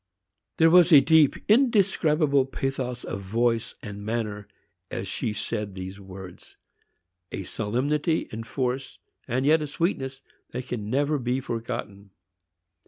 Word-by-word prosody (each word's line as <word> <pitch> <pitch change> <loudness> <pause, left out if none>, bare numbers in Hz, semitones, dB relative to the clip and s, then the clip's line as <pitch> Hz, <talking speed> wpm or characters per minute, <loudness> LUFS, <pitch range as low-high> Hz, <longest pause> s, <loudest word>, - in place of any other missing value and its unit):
There 165 0 +5
was 180 0 +7
a 150 - +10
deep, 155 -1 +5
indescribable 180 - +3
pathos 130 -2 -3
of 100 - -5
voice 115 +3 0
and 105 -1 -7
manner 105 -2 -3 0.4
as - - -4
she - - -2
said 105 -2 -3
these 95 +1 -7
words,—a 90 -1 -12
solemnity 140 - -1
and 115 +1 -6
force, 130 +3 -2 0.3
and 130 +2 0
yet 155 +2 +5
a 150 - -2
sweetness, 135 -4 -2 0.3
that 125 +1 -4
can 105 -4 -4
never 145 +4 +1
be 125 +1 0
forgotten. 110 -5 -5
125 Hz, 125 wpm, -26 LUFS, 105-145 Hz, 0.4 s, a